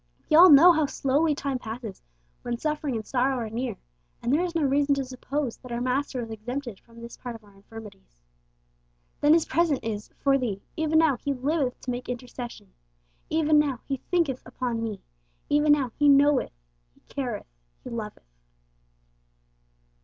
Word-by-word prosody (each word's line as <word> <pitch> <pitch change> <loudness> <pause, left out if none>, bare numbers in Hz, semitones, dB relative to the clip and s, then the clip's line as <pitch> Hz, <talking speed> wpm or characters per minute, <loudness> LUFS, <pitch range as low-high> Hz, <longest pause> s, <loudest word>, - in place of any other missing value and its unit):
We - - +6
all 355 +3 +10
know 315 +4 +9
how 315 -3 +2
slowly 290 +4 +1
time 275 -2 -2
passes 225 -3 -7 0.4
when 240 -1 -3
suffering 300 -1 -2
and 220 -1 -4
sorrow 265 +3 +1
are 225 -3 -4
near, 235 -1 -3 0.4
and 240 +3 -1
there 310 - +3
is 350 -2 -3
no 325 - +1
reason 280 +1 +2
to 275 -1 -2
suppose 260 0 -4
that 250 - -12
our 235 - -2
Master 255 +1 -1
was 225 -1 -7
exempted 240 0 -5
from 235 0 -18
this 235 0 -9
part 245 -2 -7
of 225 - -13
our 205 -1 -20
infirmities. 195 - -13 1.0
Then 295 +1 +5
His 330 -1 +4
present 325 -5 +1
is 210 -2 -4
'for 275 -1 +2
thee.' 210 -6 -3
Even 315 0 +1
now 315 -5 +4
He 280 +2 -2
'liveth 270 0 -1
to 255 - -3
make 245 0 -5
intercession;' 245 - -7 0.6
even 310 -1 +3
now 280 -5 0
He 275 - -2
'thinketh 320 -8 +1
upon 240 -3 -3
me;' 215 -4 -5 0.5
even 295 0 +4
now 270 -5 0
He 290 -1 +5
'knoweth,' 280 - +4 0.4
He - - -27
'careth,' 245 - -5 0.3
He - - -8
'loveth.' 215 - -6
260 Hz, 175 wpm, -26 LUFS, 235-290 Hz, 1.0 s, all